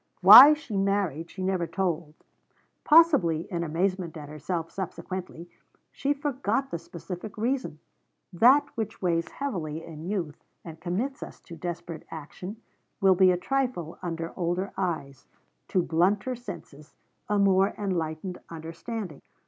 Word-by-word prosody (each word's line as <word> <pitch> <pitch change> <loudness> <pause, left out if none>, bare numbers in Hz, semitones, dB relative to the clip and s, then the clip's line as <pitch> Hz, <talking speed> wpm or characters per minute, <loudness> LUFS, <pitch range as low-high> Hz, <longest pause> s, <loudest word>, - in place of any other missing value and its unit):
Why 245 +11 +11
she 295 -8 -8
married, 195 -5 0
she 190 - -7
never 185 -2 0
told. 170 -5 -2 0.7
Possibly, 290 - +5
in 170 -2 -2
amazement 175 +1 -1
at 145 -2 -9
herself 160 +3 -4
subsequently, 185 -2 -6 0.4
she 280 - -1
forgot 275 -1 -1
the 170 - -3
specific 180 +5 -8
reason. 240 - -2 0.6
That 260 +10 +5
which 220 -3 -5
weighs 170 -2 +1
heavily 165 - -4
in 160 -1 -9
youth, 175 -8 -4 0.2
and 160 -1 -9
commits 225 - -3
us - - -9
to 170 - -11
desperate 170 0 -6
action, 170 +6 -8 0.4
will 195 -2 +5
be 185 0 +5
a 180 - +3
trifle 245 - -2
under 165 -1 -4
older 180 +3 -2
eyes, 155 -8 -4 0.4
to 180 - +1
blunter 195 +10 +1
senses, 150 - -10 0.3
a 210 - +2
more 195 0 +3
enlightened 180 -2 -3
understanding. 165 - -7
180 Hz, 130 wpm, -27 LUFS, 165-210 Hz, 0.7 s, Why